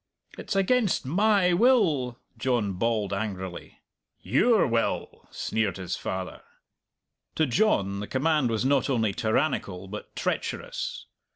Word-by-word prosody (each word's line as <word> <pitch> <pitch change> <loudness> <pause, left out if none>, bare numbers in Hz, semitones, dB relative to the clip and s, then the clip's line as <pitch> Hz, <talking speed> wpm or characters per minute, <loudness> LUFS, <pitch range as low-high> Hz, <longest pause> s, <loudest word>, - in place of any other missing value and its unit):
"It's - - -5
against 200 - +2
my 190 +4 +3
will," 175 - +3 0.2
John 115 -4 0
bawled 105 0 -1
angrily. 95 -3 -5 0.4
"Your 205 - +3
will!" 115 -2 -2
sneered 110 -4 -2
his 90 -2 -3
father. 95 -1 -5 0.9
To 160 - +3
John 115 - +1
the 105 - -5
command 150 -1 +1
was 115 +2 -1
not 140 +1 +2
only 110 -6 +1
tyrannical, 100 -4 -1
but 105 +2 -9
treacherous. - - -3
120 Hz, 115 wpm, -27 LUFS, 100-165 Hz, 0.9 s, my